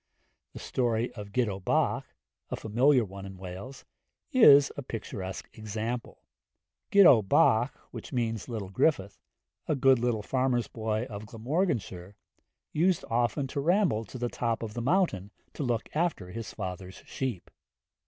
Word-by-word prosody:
The - - -9
story 120 -1 -1
of 105 -3 -9
Gitto 105 -5 0
Bach, 90 - 0 0.4
a - - -2
familiar 125 +3 +3
one 100 0 -9
in 95 -1 -9
Wales, 95 +9 -9 0.5
is 145 - +7
a - - -5
picturesque 100 -6 -6
example. 110 +2 -5 0.7
Gitto 180 - +8
Bach 110 +5 +3 0.2
(little 115 -4 -3
Griffith), 100 -4 +1 0.5
a 155 - +1
good 135 -2 +4
little 115 -3 0
farmer's 130 0 0
boy 110 -1 -2
of 105 -3 -8
Glamorganshire, 115 - -2 0.6
used 175 +3 +2
often 120 +3 +1
to 140 - -3
ramble 175 - +2
to 130 - -9
the 120 0 -1
top 115 -1 -2
of 110 -2 -5
the 120 - -4
mountain 130 - +1 0.2
to - - -6
look 120 -4 -1
after 155 - -1
his 110 -2 -6
father's 95 0 -7
sheep. 125 -9 -4
115 Hz, 135 wpm, -29 LUFS, 105-135 Hz, 0.7 s, Gitto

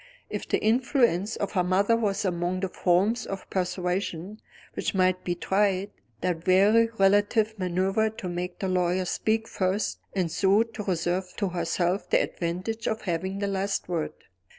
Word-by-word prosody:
If - - -4
the - - +2
influence 230 - +2
of 200 - -3
her 185 -3 +1
mother 195 +5 +3
was 205 -3 0
among 175 0 -1
the 190 - -1
forms 195 +7 +1
of 195 -1 -6
persuasion 180 +1 -2 0.3
which - - -2
might 185 -1 +2
be 175 - -1
tried, 195 +2 +1 0.3
that 175 -1 -2
wary 210 +5 +5
relative 205 +3 +3
maneuvered 195 +4 0
to 185 - -5
make 180 +1 -4
the 190 - -2
lawyer 180 0 +1
speak 220 +4 0
first, 190 +3 -1 0.2
and 180 -4 0
so 195 +5 +3
to 225 -2 -8
reserve 180 0 -1
to 200 -3 0
herself 175 +2 -1
the - - +4
advantage 185 +7 -3
of 220 - -2
having 190 +2 -2
the 200 0 -1
last 195 0 -1
word. 170 -3 -2
190 Hz, 160 wpm, -27 LUFS, 180-210 Hz, 0.3 s, wary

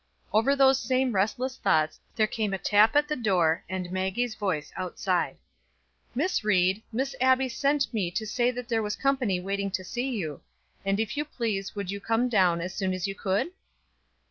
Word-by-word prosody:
Over 225 +6 +4
those 270 -1 +5
same 255 +1 +1
restless 240 +6 0
thoughts 155 0 +1 0.2
there 220 -2 +3
came 215 -2 -2
a - - -3
tap 210 +4 +4
at 295 0 +4
the 300 - -1
door, 180 - +2
and 185 -1 -4
Maggie's 190 +6 -1
voice 185 -8 -2
outside. 185 0 -1 0.8
"Miss 310 0 0
Ried, 190 -1 +2
Miss 265 +4 -2
Abbie 260 0 +4
sent 280 +2 0
me 200 -6 0
to 220 +5 -3
say 240 +3 +1
that 250 -1 -5
there 230 -2 +1
was 210 -1 -2
company 260 -9 +1
waiting 200 +2 -2
to 190 -1 -3
see 245 +7 -3
you, 165 - -4 0.4
and 195 +1 0
if 225 +5 -1
you 295 - +1
please 220 -10 -3
would 200 -2 -3
you 200 - -4
come 225 +4 +1
down 180 -6 +3
as 180 +2 -4
soon 190 -2 -1
as 185 0 -3
you 195 - -3
could?" 195 - -1
215 Hz, 190 wpm, -27 LUFS, 190-250 Hz, 0.8 s, those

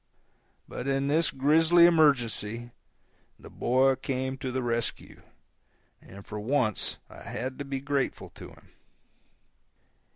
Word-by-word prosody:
But 130 - -6
in 135 0 0
this 160 +3 +2
grisly 160 +5 +4
emergency, 120 -8 +2 0.7
the - - -14
boy 130 +2 +2
came 130 0 -3
to 130 -1 -4
the 130 0 -2
rescue, 115 -1 -3 0.8
and 100 +1 -13
for 105 - -6
once 115 -1 -1
I - - -14
had 130 +2 -6
to 140 - -4
be 135 -1 -4
grateful 140 -1 -2
to - - -11
him. - - -19
135 Hz, 125 wpm, -27 LUFS, 120-145 Hz, 0.8 s, grisly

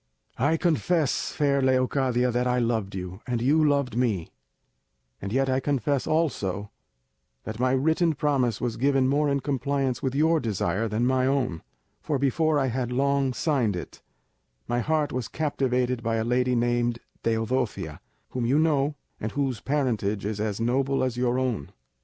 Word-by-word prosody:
"I 150 +6 +3
confess, 165 -2 +1
fair 140 -2 +1
Leocadia, 130 -1 +2
that 125 +1 0
I 125 0 +1
loved 115 -5 -1
you, 90 +2 -6
and 120 -2 -1
you 145 +6 +3
loved 140 -6 +1
me; 110 -9 0 0.9
and 100 - -4
yet 135 +3 +2
I 130 0 +2
confess 140 -1 0
also 105 - -1 0.7
that 110 +1 -6
my 130 +1 +2
written 160 +4 +2
promise 135 -6 +1
was 120 -2 -2
given 135 0 +2
more 145 +2 +2
in 140 -1 0
compliance 135 -2 -1
with 135 -2 -2
your 160 +3 +3
desire 110 -2 -1
than 110 +3 0
my 130 0 +2
own; 130 -11 0 0.4
for 145 - -1
before 150 +3 +2
I 135 - +2
had 125 -1 -2
long 140 +1 +1
signed 125 - 0
it 90 - -8 0.7
my 120 - 0
heart 155 +3 0
was 125 -3 -2
captivated 125 -5 0
by 115 0 -1
a 110 - 0
lady 125 +1 +1
named 120 0 +1 0.3
Teodosia, 115 +2 -1 0.3
whom 125 - -3
you 125 +5 +2
know, 150 -2 +2 0.2
and 110 - -4
whose 135 -5 -1
parentage 115 -8 -1
is 105 0 -3
as 105 -1 -2
noble 130 +4 +1
as 130 -2 -1
your 125 0 +1
own. 125 - -2
130 Hz, 165 wpm, -26 LUFS, 115-140 Hz, 0.9 s, I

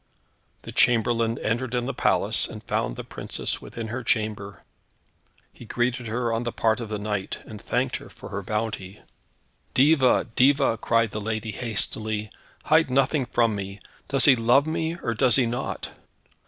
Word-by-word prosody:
The - - -8
chamberlain 115 -1 +2
entered 120 +3 -2
in 120 0 0
the 135 - -3
palace - - +2
and - - -9
found - - -1
the - - -6
princess - - -2
within 115 -1 -7
her 120 +3 -4
chamber. 105 -4 -2 0.9
He - - -13
greeted 120 +1 -1
her 115 +1 -1
on 115 - 0
the 120 - -2
part 110 0 +1
of 115 -3 -6
the 105 - -2
knight, 105 -2 -3
and - - -10
thanked - - -1
her - - -13
for - - -11
her 100 - -4
bounty. 105 -1 -4 0.7
"Diva, 135 -2 +4
diva," 135 -3 +4
cried 115 -2 +2
the 105 - -4
lady 110 +1 -3
hastily, 110 -1 -3 0.3
"hide 160 -1 +4
nothing 135 +1 +2
from 115 -2 +2
me; 100 0 -6 0.3
does 135 0 +2
he 140 - +8
love 125 +4 +4
me, 160 +1 -2
or 115 - 0
does 120 +2 +4
he 130 - +4
not?" 120 +1 -4
115 Hz, 170 wpm, -25 LUFS, 110-125 Hz, 0.9 s, he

